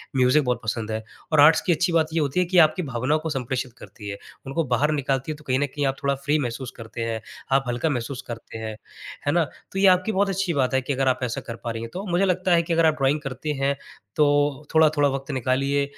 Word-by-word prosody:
Music 130 +3 +4
बहुत 125 -1 -1
पसंद 110 0 -2
है 110 0 -3 0.3
और 155 - +3
आर्ट्स 155 +2 +7
की - - 0
अच्छी 175 +3 +1
बात 160 -1 +3
ये 165 - +1
होती 145 +2 0
है 180 - +3
कि 180 +1 0
आपकी 155 +4 -5
भावनाओं 135 +2 0
को 160 - -2
संप्रेषित 130 -3 -3
करती 105 -2 -10
है। 100 - -5 0.3
उनको 135 +5 -1
बाहर 140 +3 +1
निकालती 140 0 -1
है - - -4
तो 150 - -16
कहीं 130 0 +2
न 145 - +2
कहीं 145 -1 0
आप 135 - 0
थोड़ा 140 0 +2
फ्री 145 +3 0
महसूस 125 -1 -4
करते 115 0 -7
हैं, 115 -1 -2 0.3
आप 135 0 +4
हल्का 120 +6 0
महसूस 130 -1 -3
करते 115 -1 -7
हैं। 110 -1 -5 0.5
है 145 - +2
ना? 175 0 +4 0.3
तो 195 - -3
ये 195 - +6
आपकी 185 +3 +4
बहुत 200 0 +1
अच्छी 195 -2 -1
बात 135 -3 +1
है 130 - +3
कि 135 +2 -2
अगर 135 0 0
आप 130 - +2
ऐसा 120 -1 -2
कर 115 - -7
पा 120 - -2
रही 115 0 -5
हैं 115 0 -7
तो 190 +3 -5
मुझे 180 +3 +3
लगता 185 0 +1
है 170 - +5
कि 165 +1 -2
अगर 165 0 +4
आप 160 - +5
ड्राइंग 135 +3 +3
करते 135 +1 -5
हैं 135 +1 +2 0.4
तो 150 - +4 0.5
थोड़ा-थोड़ा 155 -2 +4
वक़्त 135 +2 -4
निकालिए, 135 +2 +1
140 Hz, 260 wpm, -24 LUFS, 125-160 Hz, 0.5 s, आर्ट्स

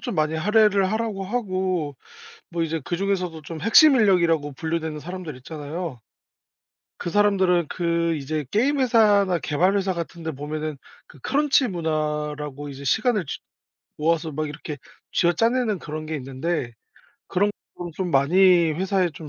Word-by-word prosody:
좀 240 -7 -4
많이 155 0 +1
할애를 200 +2 +3
하라고 220 -3 -2
하고 185 -7 -2 0.6
뭐 170 -1 -1
이제 165 0 -2
그중에서도 180 -2 -2
좀 160 +2 -7
핵심 275 - +7
인력이라고 170 - +3
분류되는 160 +1 -3
사람들 180 -3 -7
있잖아요. 150 +1 -6 1.0
그 - - -4
사람들은 190 -4 +3
그 170 -1 0
이제 150 +1 -3
게임 275 +7 +2
회사나 205 -7 +4
개발 180 +7 +1
회사 190 -1 0
같은 170 -1 -6
데 160 - -2
보면은 150 +1 -5 0.3
그 145 - -17
크런치 275 - +2
문화라고 150 -4 -3
이제 140 0 -8
시간을 215 - +1
쥐 - - -5 0.6
모아서 160 +1 0
막 155 +2 -2
이렇게 150 0 -7 0.4
쥐어짜내는 225 +5 +2
그런 155 -1 -6
게 155 +1 -5
있는데 135 0 -3 0.6
그런 205 +3 +2 0.3
부분이 175 -1 -6
좀 180 +2 -3
많이 170 +4 +5
회사에 190 +2 +1
좀 155 0 -10
170 Hz, 325 characters per minute, -24 LUFS, 155-195 Hz, 1.0 s, 핵심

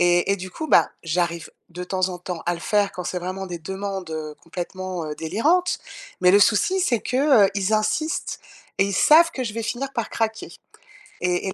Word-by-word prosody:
et 175 +2 +3
et, - - 0
du 185 -1 -7
coup, 315 - -6
bah, - - +5
j'arrive 170 0 -1 0.2
de 175 +1 -7
temps 185 0 0
en 180 - -6
temps 175 -2 -6
à 175 - +1
le 170 - -9
faire 205 +2 +1
quand 180 - -5
c'est 180 - -2
vraiment 185 +2 -4
des 175 -2 -6
demandes 190 0 -5 0.3
complètement, 180 +1 -5
heu, 150 - -4
délirantes. 290 - +1 0.4
Mais 180 0 +6
le 200 - +7
souci, 230 - +3
c'est 245 -11 +1
que, 260 -4 +4
heu, - - -3
ils 200 +2 0
insistent 310 +11 -1 0.4
et 195 - +5
ils 200 - -3
savent 330 - +6
que 260 - -3
je 225 - -4
vais 230 - -3
finir 265 +4 -3
par 235 - -2
craquer 225 -1 -2 0.7
et 180 +1 0
et - - -5
190 Hz, 210 wpm, -23 LUFS, 180-230 Hz, 0.7 s, le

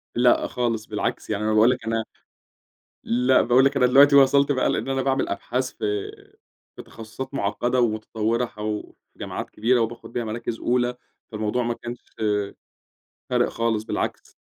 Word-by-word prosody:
لأ، 120 0 +3
خالص 115 -3 -2
بالعكس، 105 +1 -3
يعني 105 0 -2
أنا 110 0 +1
بأقول 110 +3 +5
لك 125 -3 -4
أنا 115 0 -1 1.0
لأ 125 +2 +3
بأقول 125 +2 +4
لك 140 0 +2
أنا 125 -2 +4
دلوقتي 140 +3 +6
وصَلت 140 +1 +5
بقى 130 - +1
لإن - - -2
أنا 135 0 0
بأعمل 135 0 0
أبحاث 130 +5 -2
في 410 0 -3 0.7
في - - -8
تخصصات 130 +5 -9
معقّدة 120 +3 0
ومتطوّرة 110 +1 0
حو 105 -1 -5 0.2
جامعات - - -6
كبيرة 120 +3 +1
وباخد 115 +1 -4
بيها 120 - -2
مراكز 115 +1 -4
أولى، 125 0 0 0.4
فالموضوع 110 +3 -1
ما 120 0 -1
كانش 120 +1 -7 1.3
فارق - - +2
خالص، 115 -2 -1
بالعكس. - - -4
120 Hz, 155 wpm, -24 LUFS, 110-130 Hz, 1.3 s, دلوقتي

